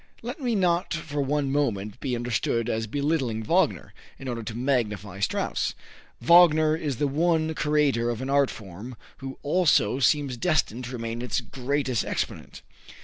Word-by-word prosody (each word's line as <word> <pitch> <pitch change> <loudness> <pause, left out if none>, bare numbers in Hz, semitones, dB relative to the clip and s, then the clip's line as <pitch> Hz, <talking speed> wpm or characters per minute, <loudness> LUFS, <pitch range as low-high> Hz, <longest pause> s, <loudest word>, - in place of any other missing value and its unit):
Let 245 +6 -6
me 240 -3 0
not 180 -2 +1
for 150 -3 -3
one 140 0 0
moment 110 -7 -1
be 125 -2 -2
understood 120 0 -1
as 110 -1 -1
belittling 140 -4 -1
Wagner, 105 - +1 0.2
in 135 - -9
order 120 -2 -3
to 115 0 -6
magnify 105 -7 -1
Strauss. 100 - -1 0.4
Wagner 155 -2 +6
is 150 -4 -3
the 145 - 0
one 160 +2 +1
creator 150 -6 +1
of 120 -2 -2
an 130 - -4
art 140 0 +3
form 105 +4 -9 0.2
who 135 -1 -7
also 150 - +3
seems 140 -2 +2
destined 130 -5 0
to 125 - -7
remain 115 -1 -4
its 125 -3 -1
greatest 130 -3 -1
exponent. - - -4
135 Hz, 155 wpm, -26 LUFS, 115-150 Hz, 0.4 s, Wagner